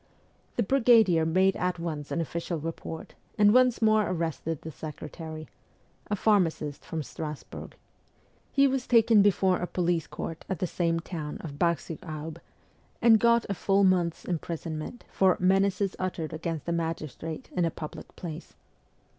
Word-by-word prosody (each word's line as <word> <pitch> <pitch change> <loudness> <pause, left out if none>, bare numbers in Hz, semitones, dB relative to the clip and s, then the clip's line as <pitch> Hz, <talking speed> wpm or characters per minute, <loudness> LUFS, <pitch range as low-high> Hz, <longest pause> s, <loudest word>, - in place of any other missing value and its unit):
The 235 - +2
brigadier 225 -9 +4
made 185 +3 +3
at 180 -1 -1
once 155 -4 -4
an 170 - -1
official 170 +1 -3
report, 160 +1 -6 0.2
and 205 0 +6
once 250 -2 +4
more 215 -1 +4
arrested 165 -2 -3
the 160 - -6
secretary 155 +1 -8 0.6
a 210 - +1
pharmacist 170 -9 +1
from 160 -2 -4
Strasburg. 150 0 -7 0.8
He 275 0 +4
was 265 -2 0
taken 225 -3 +6
before 190 -2 +3
a 180 - -2
police 175 -3 0
court 165 0 -6
at 190 - -1
the 180 - -1
same 165 -1 0
town 155 -4 -5
of 145 -3 -8
Bar 170 -1 +3
sur 165 - -8
Aube, 155 0 -6 0.6
and 225 -2 +6
got 235 0 +4
a 200 - -1
full 195 +1 +2
month's 180 -3 +2
imprisonment 165 +3 -4
for 190 -1 +3
' - - -26
menaces 195 +1 +2
uttered 180 -4 -3
against 160 -1 -4
a - - 0
magistrate 165 -1 -4
in 180 - +2
a 165 - +2
public 155 -1 -9
place.' 165 -1 -8
170 Hz, 155 wpm, -28 LUFS, 160-200 Hz, 0.8 s, and